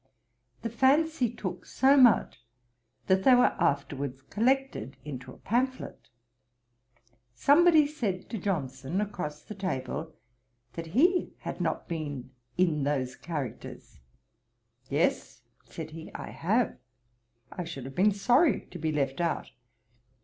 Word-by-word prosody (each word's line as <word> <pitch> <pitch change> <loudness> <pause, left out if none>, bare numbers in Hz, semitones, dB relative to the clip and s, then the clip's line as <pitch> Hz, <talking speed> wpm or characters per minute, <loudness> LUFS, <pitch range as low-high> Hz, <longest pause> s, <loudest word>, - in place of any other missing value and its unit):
The 230 - -1
fancy 270 +2 +3
took 235 - -5
so 270 +2 +4
much, 240 - +4 0.6
that 190 0 +3
they 255 +2 +7
were 245 +1 +4
afterwards 140 -1 -1
collected 240 - 0
into 130 -3 -7
a - - -13
pamphlet. 260 +3 -2 1.3
Somebody 310 - +6
said 230 -12 -3
to 225 - -3
Johnson, 145 -3 -2
across 180 -8 -4
the - - -8
table, 160 -4 -4 0.6
that 165 -1 -6
he 355 +5 +3
had - - -5
not - - -2
been 145 -7 -5 0.3
in 170 -5 +2
those 135 -3 -1
characters. 150 -7 -7 0.9
'Yes - - 0 0.3
(said 160 -1 -7
he) 160 0 -9
I - - -6
have. 220 +7 0 0.7
I 180 - -4
should 150 -6 -7
have 135 - -7
been 200 +8 +4
sorry 245 - +3
to 180 - -8
be 160 0 -1
left 140 0 -1
out.' 170 -1 -1
180 Hz, 125 wpm, -29 LUFS, -, 1.3 s, they